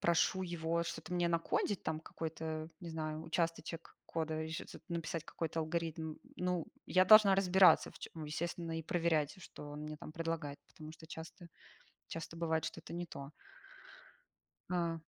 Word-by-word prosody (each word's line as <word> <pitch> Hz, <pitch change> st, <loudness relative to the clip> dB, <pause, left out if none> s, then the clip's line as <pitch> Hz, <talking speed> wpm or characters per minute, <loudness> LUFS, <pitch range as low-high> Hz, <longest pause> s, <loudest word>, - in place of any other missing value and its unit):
прошу 170 Hz, +2 st, +3 dB
его 170 Hz, -1 st, 0 dB
что-то 175 Hz, +1 st, -5 dB
мне 175 Hz, -1 st, +3 dB
накодить 170 Hz, +4 st, +1 dB
там 155 Hz, 0 st, -1 dB
какой-то, 160 Hz, -1 st, -4 dB
не 170 Hz, -2 st, -6 dB
знаю, 155 Hz, -1 st, -3 dB
участочек 165 Hz, 0 st, -2 dB
кода, 160 Hz, -1 st, -1 dB
и 160 Hz, -, -5 dB
ж 160 Hz, -, -3 dB
з -, -, -10 dB
написать 165 Hz, -1 st, -2 dB
какой-то 165 Hz, 0 st, -2 dB
алгоритм, 160 Hz, -1 st, -2 dB, 0.2 s
ну, 180 Hz, -2 st, 0 dB, 0.2 s
я 185 Hz, 0 st, +5 dB
должна 210 Hz, -1 st, +9 dB
разбираться, 190 Hz, -1 st, +6 dB
в -, -, -16 dB
чём, -, -, -7 dB
ну 160 Hz, -2 st, -5 dB
и -, -, -6 dB
естественно, 165 Hz, +1 st, -2 dB
и 165 Hz, -, -2 dB
проверять, 165 Hz, 0 st, +1 dB
что 145 Hz, -, -9 dB
он 145 Hz, +1 st, -6 dB
мне 155 Hz, 0 st, -5 dB
там 155 Hz, -, -9 dB
предлагает, 165 Hz, -3 st, -2 dB
потому 155 Hz, 0 st, -10 dB
что 160 Hz, 0 st, -13 dB
часто 165 Hz, +3 st, -8 dB, 0.6 s
часто 165 Hz, 0 st, -6 dB
бывает, 160 Hz, -1 st, +1 dB
что -, -, -4 dB
это -, -, -9 dB
не 175 Hz, +1 st, -2 dB
то. 140 Hz, -4 st, -8 dB, 1.4 s
А. 170 Hz, -2 st, +1 dB
165 Hz, 170 wpm, -36 LUFS, 160-170 Hz, 1.4 s, должна